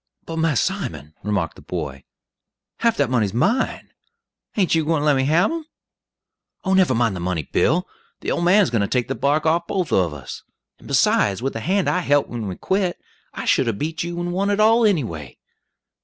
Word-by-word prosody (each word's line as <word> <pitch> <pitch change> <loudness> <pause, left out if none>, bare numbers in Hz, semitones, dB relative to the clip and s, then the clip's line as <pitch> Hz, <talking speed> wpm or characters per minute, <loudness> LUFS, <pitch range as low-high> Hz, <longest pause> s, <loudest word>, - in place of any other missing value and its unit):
"But, 165 - -6
Mass 160 -5 +2
Simon," 80 - -3
remarked 100 -6 -1
the - - -14
boy, 70 -2 -5 0.7
"half 230 -1 +2
dat 140 -4 +1
money's 110 -5 +1
mine. 205 - 0 0.7
Ain't 190 -4 +2
you 160 -1 +3
gwine 160 -1 +1
to - - -1
lemme 135 -3 +3
hab 170 - +3
'em?" 325 -2 -5 1.0
"Oh, 190 - +1
never 185 -9 +4
mind 115 -4 +1
the - - -5
money, 85 -2 -2
Bill; 175 - +1 0.3
the - - -2
old - - -1
man's 190 +2 +4
going 115 -3 +1
to 100 - +1
take 125 +2 -1
the - - 0
bark 145 +3 +1
off 170 +2 +2
both 185 -5 -1
of 90 -4 +2
us; 70 -4 -8 0.4
and - - -15
besides, 100 +3 +2
with 135 - -1
the 115 - -4
hand 190 - 0
I 180 - +2
helt 145 -4 +2
when 115 -3 -4
we 95 - -4
quit, 190 - -1 0.4
I - - -5
should 130 - +3
'a' 115 - +1
beat 160 +9 -3
you 170 0 -4
and 175 0 -2
won 195 +2 0
it 205 0 +1
all, 225 +2 +5
any 180 -9 +2
way." 75 - -8
150 Hz, 210 wpm, -22 LUFS, -, 1.0 s, all